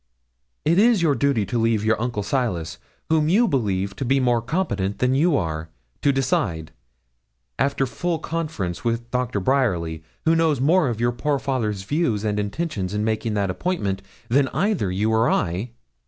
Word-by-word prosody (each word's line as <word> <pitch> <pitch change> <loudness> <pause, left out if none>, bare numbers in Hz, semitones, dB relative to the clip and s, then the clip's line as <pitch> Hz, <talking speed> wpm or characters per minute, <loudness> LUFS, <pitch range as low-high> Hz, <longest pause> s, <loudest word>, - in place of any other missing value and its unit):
It 170 +4 +4
is 220 -4 +4
your 155 -4 +4
duty 140 -7 +1
to 120 - -2
leave 115 -2 +1
your 110 0 +2
uncle 115 -4 -2
Silas, 90 - -2 0.3
whom 155 -1 +3
you 225 +7 +4
believe 100 - -1
to - - -2
be 135 +2 +2
more 120 -2 +2
competent 105 - -1
than 125 +1 +2
you 150 +2 +3
are, 80 -4 -3 0.3
to 140 - +4
decide, 100 - -1 0.9
after 140 +1 +1
full 165 +8 -2
conference 155 - -4
with 120 0 -2
Doctor 125 -4 -1
Bryerly, 90 - 0 0.2
who 165 +1 +4
knows 160 -4 +2
more 155 +2 +3
of 115 -2 -3
your 120 +1 +2
poor 140 +4 -1
father's 115 -7 -2
views 115 - 0
and 105 -1 0
intentions 105 - -3
in 105 - 0
making 110 0 -1
that 100 -2 0
appointment 100 - -2 0.3
than 135 +3 +3
either 180 - 0
you 105 +4 0
or 110 +2 +3
I.' 95 +4 0
120 Hz, 170 wpm, -23 LUFS, 100-145 Hz, 0.9 s, It